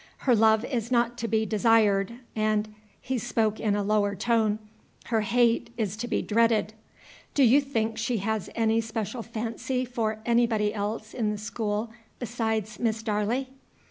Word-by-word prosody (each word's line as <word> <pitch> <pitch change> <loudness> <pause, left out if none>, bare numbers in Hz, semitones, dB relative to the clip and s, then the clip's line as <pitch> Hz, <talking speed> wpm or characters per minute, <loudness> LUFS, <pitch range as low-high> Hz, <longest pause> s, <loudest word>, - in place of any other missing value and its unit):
Her 250 -3 +5
love 220 +1 +4
is 240 -3 -3
not 240 -1 +2
to 230 - -2
be 220 -1 +1
desired, 215 -1 +3 0.2
and 215 0 0
" - - -34
he 260 -2 +1
spoke 220 -1 0
in 210 -2 +1
a 205 - 0
lower 205 0 +1
tone 220 0 +1 0.5
"her 225 -2 +1
hate 235 +2 +2
is 210 -4 -1
to 240 +2 -4
be - - -1
dreaded. 225 -1 +2 0.6
Do 280 - +5
you 260 +4 +6
think 225 -5 -2
she 230 +1 0
has 215 0 -2
any 225 0 +2
special 225 +1 -4
fancy 230 +3 -3
for 230 -3 -2
anybody 230 -3 +2
else 215 +1 -4
in 225 -4 0
the 210 - -2
school 215 +1 -3 0.3
besides 220 -3 -2
Miss 225 -1 -1
Darley?" 220 +4 -1
220 Hz, 165 wpm, -27 LUFS, 215-235 Hz, 0.6 s, you